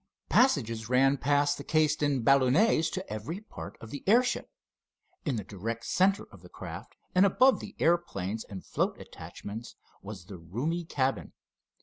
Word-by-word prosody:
Passages 115 Hz, -, +2 dB
ran 135 Hz, +2 st, +4 dB
past 145 Hz, +1 st, +2 dB
the -, -, -6 dB
cased 155 Hz, -2 st, +2 dB
in 140 Hz, -4 st, +1 dB
balloonets 140 Hz, -, +4 dB
to 190 Hz, 0 st, -4 dB
every 115 Hz, -, -5 dB
part 215 Hz, -, -10 dB
of 115 Hz, -, -11 dB
the 145 Hz, -, -6 dB
airship. 245 Hz, +5 st, +3 dB, 0.8 s
In 140 Hz, -5 st, 0 dB
the 105 Hz, -, -3 dB
direct 115 Hz, +5 st, -5 dB
center 195 Hz, +2 st, +2 dB
of -, -, -15 dB
the -, -, -14 dB
craft -, -, -9 dB, 0.2 s
and 185 Hz, -, +5 dB
above 255 Hz, +7 st, +5 dB
the 205 Hz, -, -9 dB
airplanes 115 Hz, -, 0 dB
and 95 Hz, -2 st, -9 dB
float -, -, -1 dB
attachments 110 Hz, +4 st, -9 dB, 0.3 s
was 100 Hz, -3 st, -9 dB
the 95 Hz, -2 st, -10 dB
roomy 135 Hz, -, -3 dB
cabin. 135 Hz, -4 st, -1 dB
140 Hz, 155 wpm, -29 LUFS, 110-170 Hz, 0.8 s, and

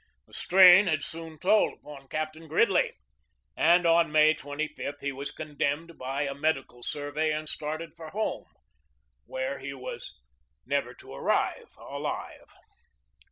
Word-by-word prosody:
The -, -, -25 dB
strain 185 Hz, +1 st, +7 dB
had 155 Hz, -4 st, 0 dB
soon 160 Hz, -1 st, -8 dB
told 200 Hz, +6 st, +3 dB
upon 140 Hz, -2 st, -13 dB
Captain 155 Hz, +2 st, -4 dB
Gridley, 180 Hz, +5 st, +2 dB, 0.6 s
and 175 Hz, +2 st, +4 dB
on 165 Hz, -1 st, +4 dB
May 155 Hz, 0 st, +6 dB
25 145 Hz, 0 st, -5 dB
he 140 Hz, -, -2 dB
was 140 Hz, +1 st, -5 dB
condemned 155 Hz, +2 st, -3 dB
by 135 Hz, +3 st, -2 dB
a 140 Hz, -1 st, -2 dB
medical 140 Hz, -4 st, -2 dB
survey 145 Hz, +4 st, -2 dB
and 155 Hz, 0 st, -3 dB
started 155 Hz, +1 st, -4 dB
for 160 Hz, -1 st, -10 dB
home, 215 Hz, +7 st, -3 dB, 0.8 s
where 130 Hz, +1 st, -3 dB
he 140 Hz, 0 st, -6 dB
was 130 Hz, -, -8 dB, 0.5 s
never -, -, -1 dB
to -, -, -13 dB
arrive 70 Hz, -, -1 dB
alive. -, -, -6 dB
155 Hz, 135 wpm, -28 LUFS, 140-165 Hz, 0.8 s, strain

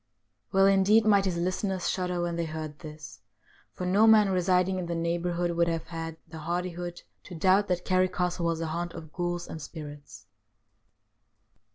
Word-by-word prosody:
Well, 195 Hz, 0 st, +5 dB
indeed, 195 Hz, +3 st, +5 dB
might 200 Hz, -2 st, +4 dB
his 180 Hz, -3 st, -1 dB
listeners 185 Hz, +1 st, -1 dB
shudder 180 Hz, -2 st, -1 dB
when 170 Hz, -1 st, -2 dB
they 170 Hz, 0 st, -1 dB
heard 155 Hz, -1 st, -6 dB
this, 155 Hz, -1 st, -10 dB, 0.5 s
for 180 Hz, -, -5 dB
no 200 Hz, +5 st, +4 dB
man 215 Hz, -2 st, +6 dB
residing 185 Hz, 0 st, +2 dB
in 175 Hz, -, -4 dB
the 170 Hz, -, -2 dB
neighbour 170 Hz, +1 st, -1 dB
hood 175 Hz, 0 st, -1 dB
would 170 Hz, 0 st, +3 dB
have 165 Hz, -1 st, -2 dB
had 165 Hz, -1 st, -5 dB
the 160 Hz, 0 st, -9 dB
hardihood 175 Hz, +1 st, -4 dB, 0.2 s
to 180 Hz, -, -9 dB
doubt 190 Hz, +5 st, +3 dB
that 180 Hz, -1 st, -1 dB
Carrick 185 Hz, 0 st, +2 dB
Castle 180 Hz, -1 st, 0 dB
was 165 Hz, -1 st, 0 dB
the 165 Hz, -, -3 dB
haunt 170 Hz, +2 st, -3 dB
of 160 Hz, -2 st, -10 dB
ghouls 175 Hz, -1 st, -2 dB
and 160 Hz, -, -7 dB
spirits. 145 Hz, -8 st, -10 dB
175 Hz, 180 wpm, -28 LUFS, 165-185 Hz, 0.5 s, man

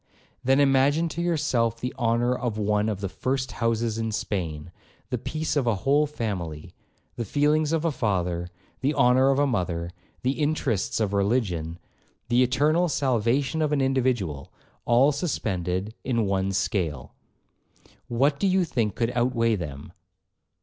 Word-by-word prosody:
'Then 135 Hz, +2 st, +3 dB
imagine 140 Hz, +4 st, +3 dB
to 165 Hz, +1 st, -4 dB
yourself 135 Hz, -9 st, 0 dB
the 125 Hz, +2 st, -3 dB
honour 120 Hz, 0 st, +1 dB
of 120 Hz, -4 st, -3 dB
one 105 Hz, 0 st, +1 dB
of 100 Hz, -2 st, -3 dB
the 100 Hz, -, -1 dB
first 130 Hz, +7 st, -2 dB
houses 115 Hz, -1 st, -1 dB
in 115 Hz, 0 st, -2 dB
Spain; 85 Hz, -7 st, -3 dB, 0.4 s
the -, -, 0 dB
peace 155 Hz, +1 st, -3 dB
of 135 Hz, -4 st, +1 dB
a 115 Hz, -, +3 dB
whole 145 Hz, +2 st, +4 dB
family,—the 100 Hz, -, -6 dB
feelings 150 Hz, +6 st, +1 dB
of 165 Hz, 0 st, 0 dB
a 165 Hz, -, +2 dB
father,—the 90 Hz, -, -2 dB
honour 130 Hz, 0 st, +4 dB
of 135 Hz, -, +2 dB
a 145 Hz, -, +3 dB
mother,—the 90 Hz, 0 st, -3 dB
interests 145 Hz, -9 st, -1 dB
of 105 Hz, -2 st, 0 dB
religion,—the 100 Hz, +2 st, -2 dB
eternal 150 Hz, +7 st, +2 dB
salvation 130 Hz, +2 st, +1 dB
of 150 Hz, -1 st, +1 dB
an 150 Hz, -, +2 dB
individual, 125 Hz, -, 0 dB, 0.3 s
all 125 Hz, +5 st, +5 dB
suspended 100 Hz, -, -2 dB
in 115 Hz, -4 st, 0 dB
one 95 Hz, 0 st, 0 dB
scale. 85 Hz, -8 st, -2 dB, 0.9 s
What 140 Hz, +4 st, +1 dB
do 200 Hz, -, +2 dB
you 185 Hz, -1 st, +3 dB
think 115 Hz, -9 st, -1 dB
could 115 Hz, 0 st, 0 dB
outweigh 120 Hz, -2 st, +1 dB
them?' 75 Hz, -3 st, -7 dB
120 Hz, 140 wpm, -25 LUFS, 100-140 Hz, 0.9 s, all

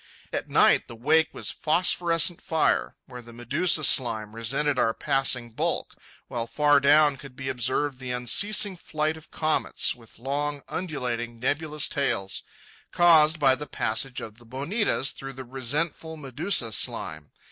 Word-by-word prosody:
At -, -, -3 dB
night -, -, +4 dB
the 120 Hz, -, -10 dB
wake 160 Hz, +7 st, +2 dB
was -, -, -5 dB
phosphorescent 170 Hz, +1 st, +1 dB
fire, 160 Hz, -1 st, 0 dB
where 125 Hz, -1 st, -10 dB
the 120 Hz, 0 st, -14 dB
medusa 140 Hz, +8 st, +1 dB
slime 110 Hz, -6 st, +3 dB
resented 135 Hz, +5 st, 0 dB
our 115 Hz, -, +1 dB
passing 125 Hz, -3 st, 0 dB
bulk, -, -, -2 dB, 0.3 s
while 115 Hz, -1 st, -4 dB
far 145 Hz, +2 st, +3 dB
down 145 Hz, 0 st, +4 dB
could 135 Hz, -1 st, -13 dB
be 135 Hz, -1 st, -5 dB
observed 130 Hz, +2 st, -1 dB
the 130 Hz, -1 st, -7 dB
unceasing 190 Hz, -, +2 dB
flight 155 Hz, -1 st, -2 dB
of 160 Hz, -, -15 dB
comets, 155 Hz, -1 st, +1 dB
with 115 Hz, -2 st, -16 dB
long, 145 Hz, +3 st, -3 dB
undulating, 120 Hz, -9 st, -4 dB
nebulous 150 Hz, +3 st, 0 dB
tails—caused 155 Hz, -, +1 dB
by 135 Hz, -3 st, +5 dB
the 150 Hz, +3 st, -4 dB
passage 120 Hz, +3 st, -2 dB
of 110 Hz, +1 st, -10 dB
the 120 Hz, -, -17 dB
bonitas 140 Hz, -, 0 dB
through 135 Hz, 0 st, -8 dB
the 130 Hz, 0 st, -9 dB
resentful 150 Hz, +6 st, -3 dB
medusa 140 Hz, -, -1 dB
slime. 80 Hz, -6 st, -4 dB
135 Hz, 145 wpm, -25 LUFS, 120-155 Hz, 0.3 s, by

